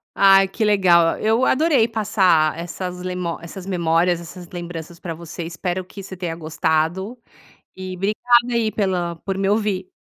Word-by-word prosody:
Ai 195 Hz, 0 st, +6 dB
que 215 Hz, +3 st, -2 dB
legal, 180 Hz, -5 st, +4 dB
eu 225 Hz, +4 st, +2 dB
adorei 275 Hz, -5 st, +3 dB
passar 190 Hz, -8 st, +2 dB
essas 180 Hz, +1 st, -6 dB
lemo 180 Hz, -2 st, -3 dB
essas 180 Hz, +2 st, -9 dB
memórias, 175 Hz, -1 st, +1 dB
essas 175 Hz, +1 st, -10 dB
lembranças 170 Hz, -1 st, -7 dB
pra 170 Hz, -2 st, -5 dB
você. 170 Hz, +1 st, -8 dB
Espero 180 Hz, +2 st, -4 dB
que 195 Hz, +2 st, -10 dB
você 190 Hz, -1 st, -9 dB
tenha 170 Hz, -2 st, -4 dB
gostado 160 Hz, +6 st, -1 dB, 0.6 s
e 185 Hz, 0 st, -6 dB
obrigada 240 Hz, +5 st, +2 dB
aí 225 Hz, -2 st, +1 dB
pela 180 Hz, -5 st, -1 dB
por 195 Hz, +2 st, -4 dB
me 195 Hz, 0 st, 0 dB
ouvir. 205 Hz, -3 st, 0 dB
185 Hz, 155 wpm, -21 LUFS, 170-205 Hz, 0.6 s, Ai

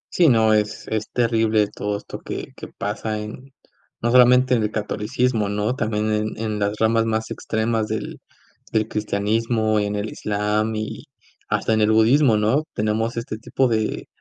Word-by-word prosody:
Sí, 170 Hz, -3 st, +5 dB
no 110 Hz, -3 st, +4 dB
es 105 Hz, -1 st, -1 dB
es 110 Hz, -1 st, -2 dB
terrible 115 Hz, -3 st, +2 dB
todo 105 Hz, 0 st, -2 dB
esto -, -, -9 dB
que -, -, -7 dB
que -, -, -9 dB
pasa 110 Hz, +1 st, -4 dB
en 115 Hz, +6 st, -9 dB, 0.5 s
no 120 Hz, +1 st, 0 dB
solamente 125 Hz, +1 st, +6 dB
en 115 Hz, -, +3 dB
el 105 Hz, -, 0 dB
catolicismo, 110 Hz, +1 st, -1 dB
¿no? 105 Hz, +4 st, -1 dB
También 110 Hz, -3 st, -1 dB
en 105 Hz, 0 st, -2 dB
en 110 Hz, -1 st, -3 dB
las 100 Hz, +1 st, 0 dB
ramas 115 Hz, 0 st, +3 dB
más 110 Hz, 0 st, -2 dB
extremas 110 Hz, 0 st, -1 dB
del 110 Hz, 0 st, -4 dB, 0.5 s
del 110 Hz, 0 st, +1 dB
cristianismo, 110 Hz, +1 st, 0 dB
en 105 Hz, 0 st, -1 dB
el 105 Hz, +1 st, -3 dB
islam 105 Hz, +1 st, -1 dB
y 110 Hz, 0 st, -5 dB, 0.4 s
hasta 110 Hz, -, +1 dB
en 110 Hz, -, +2 dB
el 105 Hz, -, +3 dB
budismo, 115 Hz, +2 st, +4 dB
¿no? 110 Hz, +8 st, +2 dB
Tenemos 110 Hz, +2 st, -1 dB
este 115 Hz, -2 st, -4 dB
tipo 130 Hz, +3 st, 0 dB
de 110 Hz, -2 st, -1 dB
110 Hz, 170 wpm, -22 LUFS, 105-115 Hz, 0.5 s, solamente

